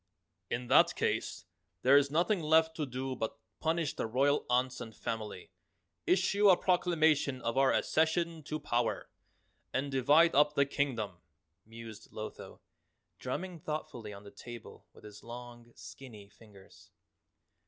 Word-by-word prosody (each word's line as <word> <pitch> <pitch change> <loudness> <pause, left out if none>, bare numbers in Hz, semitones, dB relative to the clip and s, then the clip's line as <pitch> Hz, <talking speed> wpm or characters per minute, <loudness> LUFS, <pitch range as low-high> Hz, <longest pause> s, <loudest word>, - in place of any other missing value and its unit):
"In 125 +1 -2
that - - +5
case - - -2 0.4
there 130 +2 +6
is 140 0 +5
nothing 170 +6 +1
left 160 +1 +3
to 150 -3 -2
do 130 +1 -4
but 110 -1 -4 0.2
punish 165 -1 0
the - - -2
royal 135 +5 +1
aunts 125 +1 +1
and 110 -1 -8
family, 110 -5 -5 0.6
issue 195 +3 +4
a 180 - +7
proclamation 160 -7 +2
of 115 +1 -1
our 135 0 +4
accession 160 +1 +1
to 155 0 -4
power, 120 -7 -1 0.6
and 140 +1 -2
divide 145 +6 +4
up 150 +1 +4
the 140 - +4
Kingdom," 115 -10 -2 0.5
mused 115 -1 -11
Lotho, 110 0 -8 0.6
drumming 175 +7 -4
thoughtfully 135 -8 -5
on 100 0 -10
the 100 - -12
table 120 -2 -11
with - - -19
his 105 -1 -12
long 120 0 -10
skinny 110 -7 -11
fingers. 100 -3 -18
135 Hz, 140 wpm, -32 LUFS, 115-155 Hz, 0.6 s, a